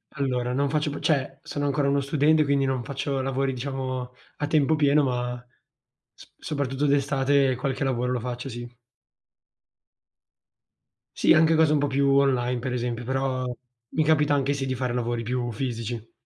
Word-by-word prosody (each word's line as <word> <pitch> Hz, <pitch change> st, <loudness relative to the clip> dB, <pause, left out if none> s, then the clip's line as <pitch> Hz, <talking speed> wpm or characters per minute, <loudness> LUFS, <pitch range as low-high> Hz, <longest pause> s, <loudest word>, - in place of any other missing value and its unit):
Allora 125 Hz, -3 st, -1 dB
non 140 Hz, +1 st, +1 dB
faccio 150 Hz, 0 st, 0 dB
più 145 Hz, -, -5 dB
cioè, 140 Hz, -4 st, 0 dB
sono 145 Hz, 0 st, -4 dB
ancora 140 Hz, 0 st, +1 dB
uno 140 Hz, -, +2 dB
studente, 150 Hz, +2 st, +3 dB
quindi 140 Hz, -1 st, +1 dB
non 130 Hz, -2 st, -1 dB
faccio 140 Hz, +1 st, -3 dB
lavori, 135 Hz, 0 st, -1 dB
diciamo 130 Hz, -1 st, -4 dB, 0.2 s
a 145 Hz, -, -2 dB
tempo 155 Hz, 0 st, +3 dB
pieno, 145 Hz, 0 st, +4 dB
ma 125 Hz, -1 st, -2 dB, 0.7 s
s -, -, -17 dB
soprattutto 140 Hz, -1 st, -2 dB
d'estate 140 Hz, -1 st, +2 dB
qualche 135 Hz, +1 st, -2 dB
lavoro 125 Hz, -2 st, 0 dB
lo 125 Hz, -, 0 dB
faccio, 125 Hz, +2 st, -5 dB
sì. 120 Hz, 0 st, -7 dB, 2.5 s
Sì, -, -, +3 dB
anche 160 Hz, +1 st, +5 dB
cose 160 Hz, -1 st, +4 dB
un 150 Hz, -, +3 dB
po' 145 Hz, -, +1 dB
più 140 Hz, 0 st, +1 dB
online, 125 Hz, -3 st, +2 dB
per 125 Hz, +1 st, -3 dB
esempio, 120 Hz, -1 st, -2 dB
però 130 Hz, 0 st, -1 dB, 0.4 s
mi 155 Hz, -, +1 dB
capita 150 Hz, -2 st, +3 dB
anche 140 Hz, 0 st, +1 dB
sì, 140 Hz, -1 st, -3 dB
di 130 Hz, -, -1 dB
fare 125 Hz, -1 st, -2 dB
lavori 120 Hz, -1 st, -1 dB
più 120 Hz, 0 st, -2 dB
fisici. 115 Hz, -1 st, -4 dB
135 Hz, 165 wpm, -25 LUFS, 125-140 Hz, 2.5 s, anche